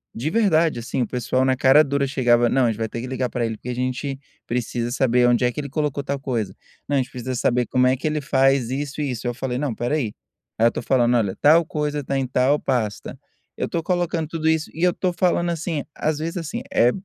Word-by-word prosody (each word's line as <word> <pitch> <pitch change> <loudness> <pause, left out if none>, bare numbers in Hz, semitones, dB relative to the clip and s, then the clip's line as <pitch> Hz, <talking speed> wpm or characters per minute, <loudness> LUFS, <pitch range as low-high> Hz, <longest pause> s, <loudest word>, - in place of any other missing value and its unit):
de 135 +7 -2
verdade, 165 - +2
assim, 120 +2 -3
o - - 0
pessoal 125 +1 0
na 130 - +2
cara 135 +4 +6
dura 140 -1 0
chegava: 120 -3 +3
"Não, 130 0 +3
a - - +3
gente 110 - -1
vai 110 -1 -2
ter 115 - -5
que 125 - -5
ligar 130 -1 -2
pra 120 0 -1
ele, 110 -1 -3
porque 125 - -8
a 125 - -1
gente 130 +2 -3 0.3
precisa 120 0 -2
saber 125 -1 +3
onde 120 0 +3
é 125 - +2
que 150 - -6
ele 140 - -4
colocou 145 -1 -2
tal 140 +1 -3
coisa"; 115 -8 -3 0.3
"não, 145 - 0
a - - +3
gente 125 - -6
precisa 130 0 -4
saber 120 0 +1
como 125 0 +3
é 130 - +2
que 140 - -3
ele 150 0 -1
faz 135 -3 +2
isso 145 +2 -3
e 140 - -1
isso". 120 0 -4
Eu 120 - -1
falei: 125 0 -3
"Não, 145 0 -1
espera 120 +6 -1
aí". 115 -9 -2 0.4
Aí, 115 +1 +5
eu - - +2
tô - - -4
falando: 120 -1 +2
"Olha, 100 -5 +1
tal 160 +3 +6
coisa 150 -1 -2
tá 135 +1 -2
em 135 - -1
tal 130 +3 +2
pasta". 115 -6 -2 0.4
Eu - - -1
tô 165 - -2
colocando 175 -2 -1
tudo 160 0 -3
isso 160 -1 0
e 165 - -7
eu 180 -1 +4
tô 185 - -1
falando 175 0 +1
assim, 165 -3 -3
às 155 -1 -1
vezes, 165 +3 -3
assim, 165 -3 -4
eh 120 +1 +5
130 Hz, 255 wpm, -22 LUFS, 120-150 Hz, 0.4 s, cara